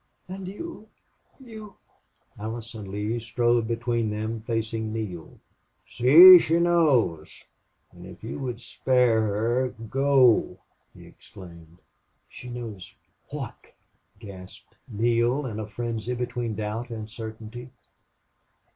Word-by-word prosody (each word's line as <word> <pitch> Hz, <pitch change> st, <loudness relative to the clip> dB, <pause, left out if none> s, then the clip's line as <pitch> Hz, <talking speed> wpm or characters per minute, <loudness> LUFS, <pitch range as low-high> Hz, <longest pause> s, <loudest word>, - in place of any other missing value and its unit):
"And 190 Hz, 0 st, -7 dB
you 220 Hz, -, -8 dB, 0.5 s
you 220 Hz, -5 st, -11 dB, 0.3 s
" -, -, -27 dB
Allison 110 Hz, -1 st, -7 dB
Lee 105 Hz, +4 st, -3 dB
strode 120 Hz, 0 st, 0 dB
between 115 Hz, -1 st, -1 dB
them 110 Hz, +1 st, -4 dB
facing 110 Hz, -1 st, -3 dB
Neale. 100 Hz, -7 st, -6 dB, 0.5 s
"See! 175 Hz, +9 st, +9 dB
She 165 Hz, +1 st, +1 dB
knows... 150 Hz, -, +1 dB, 0.5 s
and 90 Hz, 0 st, -13 dB
if 90 Hz, +1 st, -14 dB
you 115 Hz, -, -6 dB
would 125 Hz, -3 st, -5 dB
spare 125 Hz, -3 st, +1 dB
her 115 Hz, +5 st, 0 dB, 0.2 s
go!" 135 Hz, -3 st, +3 dB, 0.4 s
he -, -, -14 dB
exclaimed. 85 Hz, -3 st, -15 dB, 0.5 s
"She 125 Hz, -, -11 dB
knows 110 Hz, -7 st, -8 dB, 0.3 s
what?" -, -, -8 dB, 0.4 s
gasped 95 Hz, -4 st, -13 dB
Neale, 120 Hz, +5 st, 0 dB
in 110 Hz, -4 st, -5 dB
a 110 Hz, -, -5 dB
frenzy 115 Hz, +2 st, -4 dB
between 120 Hz, -2 st, -3 dB
doubt 110 Hz, +3 st, -4 dB
and 110 Hz, -2 st, -6 dB
certainty. 110 Hz, +2 st, -9 dB
115 Hz, 110 wpm, -25 LUFS, 110-125 Hz, 0.5 s, See